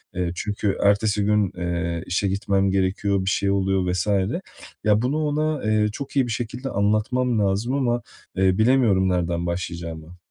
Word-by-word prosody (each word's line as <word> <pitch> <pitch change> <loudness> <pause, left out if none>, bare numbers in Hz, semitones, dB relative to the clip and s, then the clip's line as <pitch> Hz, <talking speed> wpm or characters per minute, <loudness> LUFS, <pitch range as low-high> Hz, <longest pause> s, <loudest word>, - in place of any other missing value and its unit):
Eee, 90 -1 -1
çünkü 105 0 -2
ertesi 100 0 +2
gün, 105 -2 +2
eee, 85 -1 -2
işe 90 +2 0
gitmem 100 0 +1
gerekiyor, 95 +1 0
bir 95 - +1
şey 100 0 +1
oluyor 95 -2 +1
vs. 90 +3 -1 0.8
Ya, 105 0 +3
bunu 135 +5 0
ona, 150 0 -1
eee, 110 0 +2
çok 140 +6 -7
iyi 130 -3 +3
bir - - -4
şekilde 125 +3 -4
anlatmam 110 +3 +1
lazım 100 +6 0
ama, 120 -3 +1 0.3
eee, 95 0 +2
bilemiyorum 110 -6 +3
nereden 85 -1 -1
başlayacağımı. 85 -1 -5
100 Hz, 155 wpm, -23 LUFS, 90-115 Hz, 0.8 s, Ya